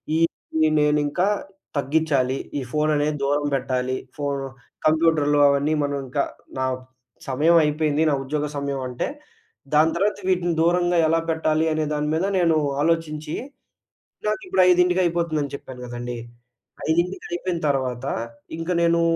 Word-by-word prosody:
ఈ - - +2 0.6
నేనింకా 150 +4 +2 0.5
తగ్గిచ్చాలి, 140 -3 +1 0.2
ఈ - - -3
ఫోను 155 0 +1
అనేది 150 +1 0
దూరం 145 +1 +1
బెట్టాలి. 130 0 -1 0.2
ఫో 145 - -4 0.6
కంప్యూటర్లు 155 -2 +3
అవన్నీ 140 +2 +2
మనం 145 0 -1
ఇంకా 140 +2 0 0.4
నా 130 - +1 0.6
సమయం 150 +6 +3
అయిపోయింది. 150 0 +1
నా - - +2
ఉద్యోగ 150 +2 -2
సమయం 140 -1 -2
అంటే, 125 - -2 0.7
దాని 155 +2 +5
తర్వాత 205 +3 0
వీటిని 175 -2 +1
దూరంగా 175 +1 +3
ఎలా 165 +1 +3
పెట్టాలి 160 0 +1
అనే 155 0 0
దాని 150 0 -1
మీద 170 - +1
నేను 165 -3 +3 0.3
ఆలోచించి, 155 -2 -1 0.9
నాకిప్పుడు 365 - +1
5:00కి 180 +1 +4
అయిపోతుందని 165 -4 -1
చెప్పాను 130 -3 -10
గదండీ. 120 0 -5 0.7
5:00కి 170 +4 0
అయిపోయిన 175 0 -2
తర్వాత, 130 -3 -1 0.5
ఇంకా 165 +2 -2
నేను 170 0 +3
155 Hz, 130 wpm, -23 LUFS, 140-170 Hz, 0.9 s, దాని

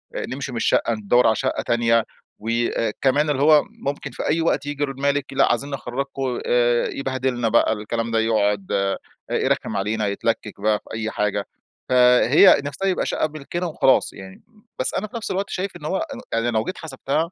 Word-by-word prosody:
نمشي 135 +1 -4
من 120 - -5
الشقّة، 115 0 +2
ندور 110 +3 +3
على 110 - +3
شقّة - - -1
تانية 115 -1 +2 0.3
وأ 115 0 -1
كمان 145 +3 +2
اللي 140 -2 0
هو 150 -1 +6
ممكن 140 +1 -5
في - - -5
أي 160 +2 +2
وقت 145 -3 0
يجي 145 0 -3
المالك 140 0 -1
لأ، - - +3
عايزين 140 - -1
نخرجكم، 135 0 -3
آآ، 120 -1 +3
يبهدلنا 130 -3 -1
بقى 115 -1 +3
الكلام 115 +2 -3
ده، 115 - +2
يقعد 105 -3 +1
آآ، 100 0 0 0.3
يرخم - - 0
علينا، 105 +2 -1
يتلكك 100 0 -2
بقى 105 0 +2
في - - -10
أي 110 0 -3
حاجة. 105 -1 -1 0.4
فهي 125 +7 +6
نفسها 195 +7 -3
يبقى 185 - 0
شقّة 155 - 0
ملكنا 155 +4 -5
وخلاص 135 -4 +2
يعني، 95 - -12 0.4
بس 130 - -1
أنا 215 - -2
في 235 - -7
نفس 225 - -4
الوقت 195 +2 -2
شايف 190 +1 -4
إن 150 - -11
هو 190 +5 0
ان 280 -5 -5
يعني 115 +1 +1
لو 110 -1 +1
جيت 185 - -5
حسبتها 160 +2 -2
125 Hz, 185 wpm, -22 LUFS, 110-145 Hz, 0.4 s, هو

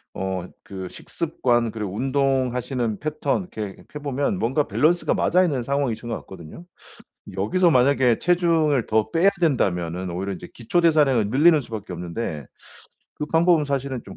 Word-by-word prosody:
어 95 -1 -3 0.2
그 95 -1 -7
식습관 120 - -1
그리고 105 -4 -5
운동하시는 130 -2 0
패턴 155 +1 -1
이렇게 105 -3 -6
해 - - -4
보면 145 +5 -1
뭔가 135 +5 0
밸런스가 170 +4 +2
맞아 180 +2 +3
있는 140 -9 0
상황이신 130 -3 -2
것 115 - -1
같거든요. 95 - -12 0.7
여기서 170 - +2
만약에 125 -3 +3
체중을 165 -7 +2
더 110 0 +1
빼야 175 +4 +4
된다면은 90 - 0
오히려 95 +3 -3
인제 - - -9
기초대사량을 140 -4 +2
늘리는 155 +6 +5
수밖에 110 -6 -7
없는데 85 - -5 0.7
그 - - -4
방법은 165 -1 +3
사실은 140 -3 -3
좀 - - -11
130 Hz, 355 characters per minute, -23 LUFS, 105-150 Hz, 0.7 s, 늘리는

